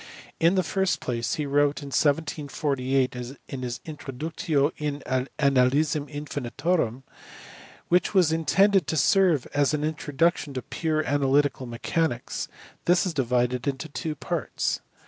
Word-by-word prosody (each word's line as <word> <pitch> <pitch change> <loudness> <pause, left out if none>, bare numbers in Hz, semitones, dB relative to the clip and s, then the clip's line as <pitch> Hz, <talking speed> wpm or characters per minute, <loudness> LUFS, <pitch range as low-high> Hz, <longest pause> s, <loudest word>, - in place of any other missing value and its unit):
In 170 +3 +4
the 185 - +3
first 190 +3 0
place, 115 -2 -2
he 150 - -2
wrote 145 +1 +1
in 140 - -7
1748 140 -3 0
his 125 +2 -7
Introductio 145 - -2
in 145 -1 -3 0.4
Analysin 145 +2 +2
Infinitorum, 145 -2 -2 0.8
which 180 +1 +3
was 185 -6 +4
intended 190 +3 +3
to 160 - -1
serve 175 -3 +4
as 145 +1 +2
an 150 - -2
introduction 155 -1 0
to 130 - -3
pure 155 -2 -1
analytical 140 -1 +1
mathematics. 120 +3 -2 0.4
This 175 +3 +4
is 180 - -2
divided 125 -1 0
into 140 +3 -2
two 155 +1 -4
parts. - - -2
145 Hz, 125 wpm, -26 LUFS, 135-160 Hz, 0.8 s, In